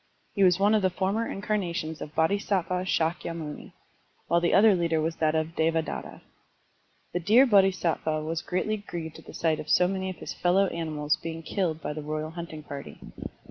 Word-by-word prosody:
He 200 - +2
was 180 -1 +5
one 205 +2 +4
of 215 - +4
the 190 - +3
former 195 +5 -1
incarnations 180 -6 -2
of 150 - -7
Bodhisattva 185 +1 +1
Shakyamuni, 165 -3 -2 0.5
while 170 0 +3
the 170 - +2
other 210 +1 +6
leader 170 -3 +1
was 160 +1 -1
that 155 0 +1
of 160 +1 -1
Devadatta. 160 0 -1 0.9
The 175 - 0
Deer 220 +10 +6
Bodhisattva 185 - +2
was 160 +1 -2
greatly 215 +4 -1
grieved 170 -6 -7
at - - -16
the - - -11
sight 160 -2 +1
of 150 - -7
so 180 - +5
many 190 0 -2
of 185 - -5
his - - -6
fellow 185 +3 +3
animals 155 -2 -1
being 165 0 -6
killed 165 -3 -1
by - - -2
the 155 - -5
royal 155 +1 -4
hunting 165 -2 -7
party. 140 -1 -8
170 Hz, 180 wpm, -27 LUFS, 160-190 Hz, 0.9 s, other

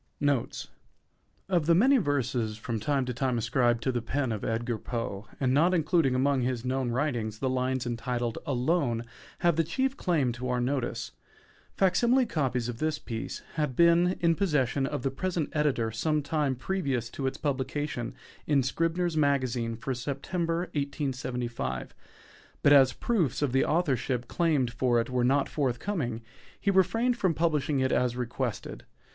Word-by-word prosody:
NOTES 140 - 0 0.8
Of 175 -5 +1
the 170 - +6
many 265 +9 +5
verses 125 - 0
from 115 0 -3
time 135 +3 0
to 125 - -3
time 125 0 0
ascribed 120 0 +1
to 130 - +1
the 120 -1 -1
pen 130 +2 -1
of 110 -2 -3
Edgar 115 0 -1
Poe, 115 -4 -4
and 130 -2 +2
not 170 +6 +4
included 160 -5 +2
among 135 +1 +2
his 125 -1 -2
known 130 -1 0
writings, 120 -4 -1
the 130 - -1
lines 130 0 0
entitled 120 0 -2
"Alone" 130 -3 0 0.4
have 170 -3 +3
the 165 - +4
chief 260 - -1
claim 155 - +1
to 125 +2 -5
our 125 0 +1
notice. 120 -3 -2 0.7
_Fac 190 -2 +3
simile 245 +4 +4
_copies 130 - -1
of 120 -1 -5
this 155 -1 0
piece 115 -5 -6
had 150 -5 0
been 170 +3 +4
in 170 -1 +4
possession 145 - +1
of 125 - -4
the 135 - 0
present 170 +2 -2
editor 140 -7 +1
some 150 +7 0
time 145 -2 0
previous 135 -5 -2
to 135 - -3
its 130 - -3
publication 140 -3 -2 0.3
in 140 -3 +3
"Scribner's 165 +5 0
Magazine" 130 -6 +1
for 130 +4 -3
September, 165 +7 -2
1875; 125 - -3 0.7
but 145 - +7
as 135 -2 +7
proofs 160 - 0
of 140 - +1
the 135 +1 +3
authorship 130 -7 0
claimed 150 -8 +1
for 120 0 +2
it 115 +2 -2
were 125 -1 +1
not 135 +3 +3
forthcoming, 130 - -2 0.4
he 200 - +1
refrained 225 +6 +3
from 185 -8 +1
publishing 150 -4 +1
it 130 0 +1
as 125 -1 +1
requested. 125 -1 -4
135 Hz, 165 wpm, -28 LUFS, 120-155 Hz, 0.8 s, but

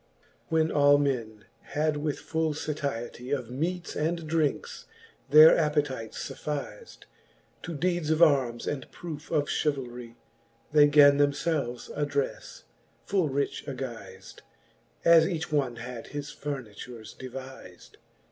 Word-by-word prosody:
IV. - - -36
When 160 0 +2
all 145 0 +5
men 115 -7 -2 0.2
had 150 0 -1
with 145 -1 -2
full 160 +1 -1
fatistie 140 -3 -3
Of 120 -2 -9
meates 170 +6 -3
and 165 +1 -2
drinkes 155 -3 -1 0.4
their 155 +3 +9
appetites 145 -7 -1
fuffiz'd. 150 - -6 0.6
To 170 - -6
deedes 175 -1 0
of 160 0 +2
armes 130 -7 +3
and 135 -3 -4
proofe 160 -3 -8
of 150 -3 +1
chevahis 125 -5 -3 0.6
They 150 -1 +7
gan 145 -1 +6
themfelves 145 -3 0
addrefle, 145 -2 -3 0.4
full 185 -6 +1
rich 140 +1 -2
aguizM, 130 -4 -8 0.7
As 165 -1 +7
each 165 -3 -3
one 135 -5 0
had 120 0 -8
his 145 0 -6
furnitures 125 -6 -7
deviz'd. 130 -7 -10
145 Hz, 120 wpm, -28 LUFS, 125-155 Hz, 0.7 s, their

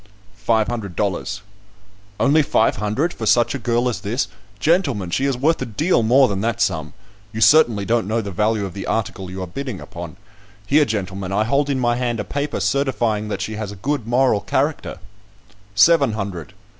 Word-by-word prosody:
"Five 110 -2 +3
hundred 105 -7 -4
dollars." 100 +1 -2 0.8
"Only 150 +3 +4
five 115 -5 +2
hundred 110 - -1
for 110 - -5
such 120 +1 +3
a - - -3
girl 120 +1 0
as 120 - -2
this? 115 +6 -1 0.3
Gentlemen, 140 - +1
she 135 - 0
is 135 -3 0
worth 155 +5 +1
a - - -1
deal 150 - +1
more 130 +4 +5
than 100 -3 -2
that 115 +1 -1
sum; 80 - -1 0.4
you 110 - -5
certainly 115 -6 +5
don't 115 -2 +1
know 110 +2 0
the 100 -3 -4
value 105 +2 0
of 95 - -7
the 95 - -6
article 95 -4 -2
you 95 0 -5
are - - -3
bidding 120 +4 -6
upon. 85 -2 -9 0.5
Here, 150 +6 +4
gentlemen, 95 -4 -4
I 105 +2 +2
hold 140 +5 +1
in 135 -2 0
my 120 -1 +1
hand 120 -2 -1
a - - -1
paper 145 +6 -3
certifying 120 -6 0
that 100 -2 -4
she 110 -1 -5
has 105 -2 -4
a - - -8
good 130 +4 -3
moral 125 -2 +3
character." - - -1 0.8
"Seven 140 +2 +5
hundred." 100 -7 -5
115 Hz, 195 wpm, -20 LUFS, 100-130 Hz, 0.8 s, more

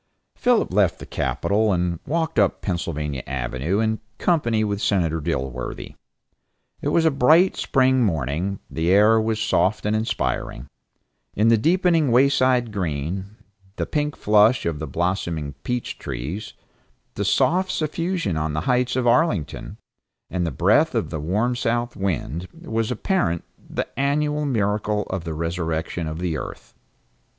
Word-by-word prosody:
Philip 245 - +1
left 95 -3 +3
the - - -9
capitol 105 +1 0
and 90 -2 0
walked 160 -4 0
up 100 -3 +2
Pennsylvania 75 - -2
Avenue 70 - -2
in 110 0 0 0.2
company 120 -11 +1
with 100 -1 -2
Senator 80 -5 +1
Dilworthy. 65 -3 -4 0.9
It - - -2
was 165 - +3
a 160 - +5
bright 155 +7 +4
spring 130 -1 +2
morning, 85 - -1
the 80 +1 -1
air 105 +4 +5
was 110 0 -1
soft 105 -2 +1
and 105 0 +1
inspiring; 110 +1 -2 0.7
in 110 +3 +3
the 115 - +5
deepening 165 - +3
wayside 130 -2 +3
green, 90 -1 -2 0.5
the - - -2
pink 150 -1 -1
flush 105 +4 +4
of 80 -3 -1
the 80 - -4
blossoming 85 -2 -2
peach 125 +8 -3
trees, 70 - -5 0.6
the - - -2
soft 185 +2 +2
suffusion 165 - -1
on 80 -1 -1
the 75 - -1
heights 125 +5 +1
of 130 -1 0
Arlington, 120 - +1 0.5
and 90 -2 -1
the - - -2
breath - - +3
of - - -1
the 80 - -3
warm 105 +11 0
south 120 0 -1
wind 90 -3 -2
was 115 -9 -2
apparent, 125 - 0 0.3
the - - -2
annual 150 +2 +1
miracle 105 -4 0
of 95 -2 -3
the 80 -2 -4
resurrection 80 0 -2
of 80 0 -4
the 85 -4 -2
earth. - - -9
105 Hz, 145 wpm, -23 LUFS, 85-125 Hz, 0.9 s, a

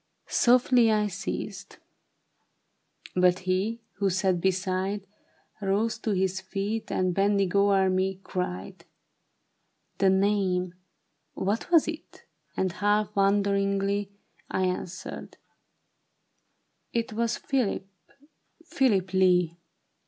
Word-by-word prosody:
Softly 245 -2 +4
I 210 -1 +2
ceased; 200 0 -5 1.4
but 180 0 +4
he 195 +5 0 0.2
who 200 -1 +1
sat 185 -1 +1
beside 190 +1 -1 0.6
Rose 210 +3 0
to 225 - -3
his 190 0 0
feet 205 +3 -3
and 185 -1 +1
bending 200 0 +1
o'er 200 -1 +4
me, 185 0 0
cried, 95 - -4
^^ - - -21 1.1
The 195 - +4
name, 190 -2 +1 0.6
what 200 +4 -2
was 335 -3 +5
it? 325 -1 -8
" - - -36
And 185 -1 +1
half 210 +2 0
wonder 200 0 +3
ingly, 200 0 0 0.4
I 190 - 0
answered, 185 0 -5 0.8
'' - - -48
It 225 -1 -5
was 235 +1 0
Philip, 250 -8 -1 0.8
Philip 205 - +1
Lee." 180 -3 +3
195 Hz, 110 wpm, -27 LUFS, 185-210 Hz, 1.4 s, was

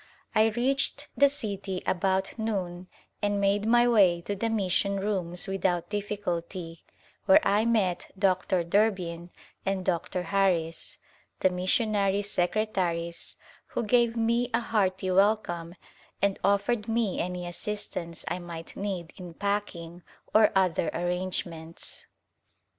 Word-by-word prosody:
I 215 +1 +5
reached 255 +5 0
the 280 0 +6
city 200 -8 -3
about 190 +1 +1
noon 185 -5 -3 0.3
and 205 0 +1
made 200 +1 +2
my 240 +1 +5
way 190 -7 +5
to 200 +4 -3
the 225 +3 -1
mission 200 -2 +1
rooms 190 -2 -2
without 180 -2 -1
difficulty, 185 -5 -4 0.4
where 190 - +8
I 210 +3 +3
met 210 -7 +1
Dr. 185 -2 +2
Durbin 175 -3 0 0.3
and 190 -1 -1
Dr. 180 +1 -1
Harris, 175 -3 0 0.4
the 185 - +4
missionary 200 +2 +1
secretaries, 180 -4 -1 0.3
who - - -2
gave 235 +1 +3
me 235 +2 +1
a - - +3
hearty 190 -5 0
welcome 185 -4 +1 0.4
and 200 -1 +1
offered 205 +2 +1
me 225 -4 0
any 180 0 -3
assistance 175 -2 -4
I 175 - -2
might 170 -2 -8
need 190 -5 -4
in 175 -3 -9
packing 185 -4 -3 0.3
or 215 -1 +6
other 185 -4 +2
arrangements. 175 -2 -4
195 Hz, 120 wpm, -28 LUFS, 175-210 Hz, 0.4 s, where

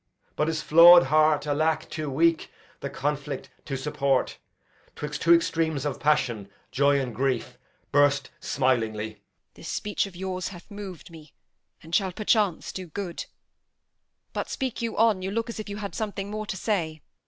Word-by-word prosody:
But 150 - +1
his 160 -1 -1
flaw'd 170 +2 +9
heart 155 +2 +3
(Alack, 155 +2 0
too 155 -2 -4
weak 165 +4 +2 0.3
the - - -4
conflict 145 0 -3
to 135 -2 -3
support!) 135 -1 0 0.6
'Twixt 150 0 -5
two 170 - +3
extremes 160 -3 0
of 145 - -2
passion, 125 -9 +1 0.2
joy 140 +2 +3
and 125 -3 -3
grief, 130 0 -2 0.3
Burst 145 0 +3
smilingly. 110 -5 0
Edm. - - -27 0.4
This - - -11
speech 205 -1 -1
of 190 - -13
yours 185 0 -3
hath 180 +2 -11
mov'd 195 -5 -8
me, 155 -3 -14 0.5
And 165 +1 -13
shall 190 -1 +2
perchance 210 -3 +1
do 185 -1 -7
good; 175 +1 -5 1.1
but - - -3
speak 260 -3 -3
you 230 -1 -3
on; 220 -4 +3
You 190 - -3
look 230 +3 -2
as 220 - -5
you 200 - -5
had 205 -2 -5
something 205 -2 -4
more 215 0 -4
to 190 - -4
say. 165 -7 -2
160 Hz, 165 wpm, -26 LUFS, 145-190 Hz, 1.1 s, flaw'd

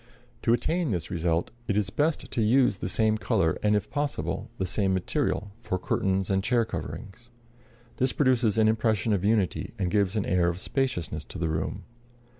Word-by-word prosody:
] - - -32
To - - +2
attain 160 +7 +1
this 90 -6 -2
result, 85 -1 0 0.2
it 100 - +1
is 100 -2 0
best 150 - 0
to 115 - 0
use 115 -2 +3
the 90 - -3
same 110 +2 +2
color 80 -6 +1
and, 105 0 +3
if 105 - -2
possible, 100 - -2
the 95 - -1
same 95 +1 +1
material, 100 +2 -1
for 95 - -2
curtains 95 +1 0
and 95 0 +1
chair 115 +1 +2
coverings. 115 +1 -7 0.7
This 130 0 +2
produces 125 -6 +2
an 110 -1 +5
impression 110 -1 +2
of 100 -2 0
unity 105 -1 0
and 90 -4 -1
gives 100 0 +2
an 105 - 0
air 90 -1 +2
of 85 +1 -4
spaciousness 90 - -2
to - - -8
the 85 -2 -1
room. 80 0 -2
105 Hz, 190 wpm, -27 LUFS, 90-115 Hz, 0.7 s, an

